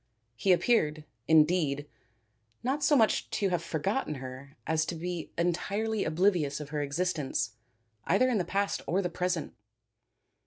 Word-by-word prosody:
He 190 Hz, +11 st, +2 dB
appeared, 155 Hz, -6 st, +2 dB, 0.2 s
indeed, 155 Hz, -2 st, +3 dB, 0.8 s
not 275 Hz, +4 st, 0 dB
so 295 Hz, -, +5 dB
much 225 Hz, -5 st, +3 dB
to 200 Hz, -, 0 dB
have 175 Hz, -2 st, 0 dB
forgotten 170 Hz, -, -1 dB
her 130 Hz, +1 st, -9 dB
as 160 Hz, -1 st, +1 dB
to 175 Hz, -, -3 dB
be 175 Hz, 0 st, -4 dB
entirely 200 Hz, +5 st, 0 dB
oblivious 170 Hz, -5 st, +1 dB
of 150 Hz, -1 st, -7 dB
her 150 Hz, -1 st, -2 dB
existence 145 Hz, -6 st, -1 dB, 0.5 s
either 195 Hz, +9 st, +3 dB
in 240 Hz, -5 st, +1 dB
the -, -, +1 dB
past 200 Hz, +3 st, -1 dB
or 190 Hz, +4 st, +1 dB
the 180 Hz, -, -2 dB
present. 180 Hz, -2 st, -2 dB
175 Hz, 145 wpm, -29 LUFS, 150-195 Hz, 0.8 s, so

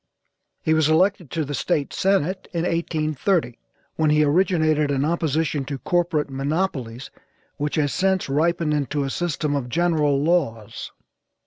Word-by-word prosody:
He 160 Hz, -, +2 dB
was 155 Hz, -1 st, +3 dB
elected 180 Hz, 0 st, +2 dB
to 160 Hz, +1 st, -2 dB
the 145 Hz, -, -5 dB
State 140 Hz, +1 st, -1 dB
senate 190 Hz, -1 st, 0 dB
in 165 Hz, -1 st, -1 dB
1830, 160 Hz, -, -1 dB, 0.4 s
when 155 Hz, -1 st, +2 dB
he 150 Hz, 0 st, +4 dB
originated 155 Hz, -2 st, +2 dB
an 140 Hz, 0 st, +1 dB
opposition 160 Hz, -2 st, 0 dB
to 140 Hz, 0 st, -4 dB
corporate 170 Hz, 0 st, 0 dB
monopolies 135 Hz, -4 st, -3 dB, 0.5 s
which 150 Hz, 0 st, -2 dB
has 145 Hz, -3 st, +1 dB
since 190 Hz, -1 st, +1 dB
ripened 160 Hz, +2 st, +1 dB
into 145 Hz, 0 st, -1 dB
a 135 Hz, -, -3 dB
system 150 Hz, -3 st, -1 dB
of 130 Hz, -3 st, -3 dB
general 155 Hz, -3 st, +2 dB
laws. 140 Hz, -11 st, -1 dB
155 Hz, 140 wpm, -23 LUFS, 145-170 Hz, 0.5 s, he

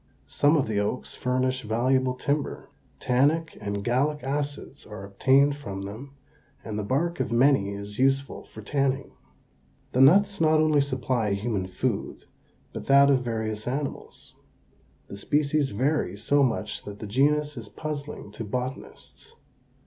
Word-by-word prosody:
Some 145 Hz, +2 st, +3 dB
of 140 Hz, -, +1 dB
the 105 Hz, -2 st, 0 dB
oaks 105 Hz, +5 st, -2 dB
furnish 130 Hz, +1 st, -1 dB
valuable 125 Hz, +3 st, +1 dB
timber. 145 Hz, +3 st, -3 dB, 0.3 s
Tannic 145 Hz, +6 st, +1 dB
and 100 Hz, -1 st, -3 dB
gallic 140 Hz, +6 st, 0 dB
acids 145 Hz, +1 st, -4 dB
are 105 Hz, -2 st, -8 dB
obtained 135 Hz, +8 st, +3 dB
from 100 Hz, -9 st, -6 dB
them 120 Hz, +8 st, -8 dB, 0.5 s
and 105 Hz, -1 st, -4 dB
the -, -, -2 dB
bark 160 Hz, +11 st, -1 dB
of -, -, -1 dB
many 120 Hz, -4 st, +3 dB
is 100 Hz, +2 st, -8 dB
useful 135 Hz, +1 st, +1 dB
for 110 Hz, -, -12 dB
tanning. 135 Hz, +2 st, -1 dB, 0.8 s
The 125 Hz, -, +2 dB
nuts 200 Hz, +7 st, +5 dB
not 155 Hz, -1 st, +4 dB
only 155 Hz, -2 st, +4 dB
supply 130 Hz, -6 st, -1 dB
human 100 Hz, -2 st, -2 dB
food 100 Hz, +4 st, -3 dB, 0.5 s
but -, -, -7 dB
that 140 Hz, +1 st, +6 dB
of 130 Hz, -2 st, +3 dB
various 110 Hz, -2 st, -3 dB
animals. 140 Hz, +3 st, -5 dB, 0.7 s
The 100 Hz, -, -8 dB
species 145 Hz, +5 st, +1 dB
vary 125 Hz, -, 0 dB
so 140 Hz, +7 st, +2 dB
much 115 Hz, -7 st, -1 dB
that 100 Hz, 0 st, -8 dB
the 110 Hz, -, -7 dB
genus 145 Hz, +7 st, +1 dB
is 115 Hz, -4 st, -8 dB
puzzling 150 Hz, -7 st, -6 dB
to 115 Hz, -, -6 dB
botanists. 125 Hz, +5 st, -6 dB
130 Hz, 145 wpm, -26 LUFS, 110-145 Hz, 0.8 s, that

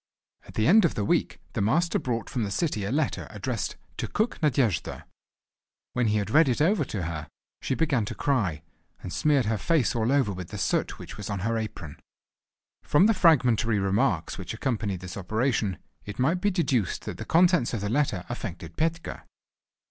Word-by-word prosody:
At -, -, -13 dB
the 110 Hz, -, +1 dB
end 215 Hz, -, +6 dB
of 170 Hz, -, +2 dB
the 105 Hz, -, -1 dB
week -, -, 0 dB
the -, -, -1 dB
Master 160 Hz, -, +2 dB
brought 115 Hz, -4 st, -2 dB
from 120 Hz, -, -2 dB
the 100 Hz, -, -2 dB
city 110 Hz, -, -1 dB
a 100 Hz, -, -2 dB
letter 150 Hz, +1 st, -1 dB
addressed 110 Hz, 0 st, -3 dB, 0.2 s
"to -, -, -2 dB
Cook 220 Hz, -1 st, -1 dB
Nadejda." 130 Hz, -, 0 dB, 0.9 s
When 125 Hz, -2 st, +1 dB
he 105 Hz, 0 st, +2 dB
had 100 Hz, 0 st, -2 dB
read 155 Hz, 0 st, +5 dB
it 120 Hz, -, 0 dB
over 170 Hz, +3 st, +3 dB
to 100 Hz, -7 st, -4 dB
her 80 Hz, -2 st, -4 dB, 0.3 s
she 130 Hz, -, -1 dB
began 135 Hz, -9 st, +1 dB
to -, -, -5 dB
cry, 100 Hz, -, 0 dB, 0.4 s
and 90 Hz, -, -6 dB
smeared 145 Hz, -5 st, +2 dB
her 110 Hz, -1 st, 0 dB
face 160 Hz, -9 st, +1 dB
all 115 Hz, +1 st, +1 dB
over 135 Hz, -8 st, +2 dB
with 90 Hz, -2 st, -6 dB
the 105 Hz, -, -7 dB
soot 95 Hz, -, 0 dB
which -, -, -9 dB
was 105 Hz, 0 st, -6 dB
on 100 Hz, -2 st, -3 dB
her 115 Hz, +4 st, 0 dB
apron. 105 Hz, -9 st, -5 dB, 0.8 s
From 150 Hz, +6 st, +4 dB
the 225 Hz, -, +5 dB
fragmentary 125 Hz, -, +4 dB
remarks 95 Hz, -4 st, 0 dB
which -, -, -5 dB
accompanied 105 Hz, -7 st, -2 dB
this 90 Hz, 0 st, -7 dB
operation, 110 Hz, 0 st, 0 dB, 0.3 s
it 105 Hz, -, -8 dB
might 160 Hz, +8 st, +1 dB
be 205 Hz, -, +3 dB
deduced 140 Hz, -, 0 dB
that -, -, -6 dB
the -, -, -3 dB
contents 175 Hz, -5 st, +3 dB
of 110 Hz, -, -3 dB
the 100 Hz, -, -2 dB
letter 115 Hz, -8 st, 0 dB
affected 85 Hz, -8 st, -6 dB
Petka. 165 Hz, +1 st, -2 dB
115 Hz, 195 wpm, -27 LUFS, 100-150 Hz, 0.9 s, end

